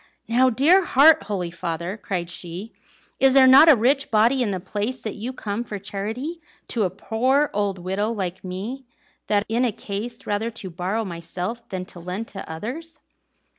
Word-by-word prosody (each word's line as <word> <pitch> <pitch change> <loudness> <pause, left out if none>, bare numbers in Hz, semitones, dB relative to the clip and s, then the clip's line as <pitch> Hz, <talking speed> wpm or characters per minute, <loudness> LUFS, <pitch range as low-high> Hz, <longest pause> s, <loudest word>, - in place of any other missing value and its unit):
"Now, 250 +3 +4
dear 310 +11 +4
heart, 310 +1 +6
holy 185 -5 -3
father!" 170 +2 -4
cried 185 -5 -4
she, 180 +6 -7 0.5
"is 265 0 +4
there 265 -1 +8
not 265 +5 +9
a 300 - +9
rich 270 +4 +2
body 230 +5 +3
in 235 - +1
the 190 -2 -2
place, 210 +7 -3
that 215 - -3
you 230 +5 -5
come 220 -3 -4
for 210 -3 -6
charity 220 - -5 0.3
to 235 - -1
a - - 0
poor 255 +9 +1
old 200 -2 0
widow 190 +5 -2
like 190 -4 -4
me, 200 +9 -5 0.4
that 205 0 +2
am 225 - -1
in 250 - +3
a 245 - +2
case 205 +4 -6
rather 210 +3 -1
to 215 -5 -8
borrow 190 +6 -2
myself 180 +6 -6
than 185 -2 -4
to 180 - -13
lend 185 +6 -5
to 195 -5 -8
others?" 280 - -7
215 Hz, 185 wpm, -23 LUFS, 190-255 Hz, 0.5 s, not